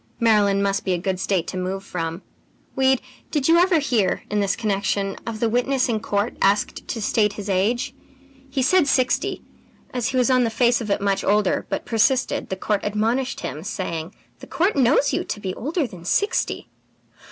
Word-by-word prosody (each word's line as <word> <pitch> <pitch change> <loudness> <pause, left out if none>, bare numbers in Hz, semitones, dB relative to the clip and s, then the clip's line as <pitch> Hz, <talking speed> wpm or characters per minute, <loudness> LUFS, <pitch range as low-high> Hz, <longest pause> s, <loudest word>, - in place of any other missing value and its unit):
Maryland 205 -3 +3
must 195 0 0
be 190 - 0
a - - +1
good 185 +1 -2
State 185 -2 0
to 185 - -5
move 190 +1 -3
from. 165 -1 -4 0.5
Weed, 265 -1 +2 0.3
did 290 -4 0
you 335 +1 +6
ever 360 -1 +4
hear, 235 - +1
in 210 - +1
this 200 -1 +1
connection, 200 -2 -1
of 225 -1 -4
the 230 - +2
witness 250 +3 +1
in 225 -3 0
court 205 0 -1
asked 200 +2 +1
to 230 - -3
state 210 -1 +1
his 205 -1 -7
age? 225 +8 0 0.6
He 265 -1 -1
said 350 +2 +4
sixty. 255 -2 +1 0.5
As 250 -2 -1
he 260 - -1
was 255 +1 +3
on 255 -1 +4
the 230 - +1
face 240 +2 +2
of 215 - -5
it 200 - 0
much 195 -1 0
older, 205 -1 +1
but - - -3
persisted, 245 +3 +1
the 190 - -2
court 205 +1 -1
admonished 225 +6 -1
him, 155 - -5
saying: 180 -4 -4 0.2
"'The - - -11
court 365 +5 +1
knows 275 +1 +3
you - - 0
to - - -4
be 190 -2 -4
older 300 - -2
than 180 -8 -10
sixty!' 410 - 0
215 Hz, 195 wpm, -22 LUFS, 195-255 Hz, 0.6 s, you